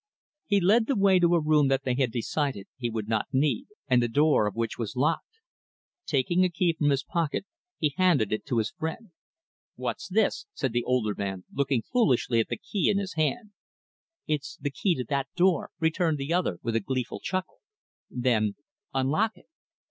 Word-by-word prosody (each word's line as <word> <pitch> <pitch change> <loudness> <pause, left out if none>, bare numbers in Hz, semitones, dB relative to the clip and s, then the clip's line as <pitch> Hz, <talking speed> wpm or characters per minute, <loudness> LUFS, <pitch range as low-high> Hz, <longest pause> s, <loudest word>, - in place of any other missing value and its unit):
He 205 -1 +3
led 220 +5 +4
the 275 - +1
way 195 -3 +4
to 175 0 +4
a - - +4
room 150 -2 +3
that 135 0 +1
they 130 - 0
had 130 -2 +1
decided 125 -2 -2
he 120 -2 -3
would 110 -2 -4
not 110 -1 0
need, 135 -3 +1 0.2
and 125 -3 +4
the 120 - +1
door 145 -3 +3
of 105 - -4
which 115 0 -2
was 115 +1 -4
locked. 165 - -1 0.7
Taking 165 +6 +2
a 185 - +3
key 175 0 +1
from 150 -2 +1
his 135 -1 +1
pocket, 170 +2 -2 0.3
he 150 -3 0
handed 160 - +3
it 110 - -2
to 125 -4 0
his 110 -1 0
friend. 165 +6 -5 0.6
"What's - - -4
this?" 205 +2 +1
said 130 -4 -2
the 120 - +2
older 125 -4 +1
man, 95 -2 -4
looking 135 -4 0
foolishly 130 - +2
at 110 - +1
the - - -2
key 200 - 0
in 200 - +2
his 195 -2 -3
hand. 210 +8 -1 0.7
"It's 150 -2 -3
the 145 - -3
key 180 +5 +1
to 125 - -2
that 140 -1 0
door," 180 -1 +2
returned 160 -1 +1
the 140 +4 -2
other, 175 - 0
with 115 -1 -1
a - - +4
gleeful 125 +3 -3
chuckle. 185 0 -4 0.5
Then 115 -5 +1 0.4
"Unlock 155 +12 +1
it." - - -20
145 Hz, 195 wpm, -27 LUFS, 120-175 Hz, 0.7 s, led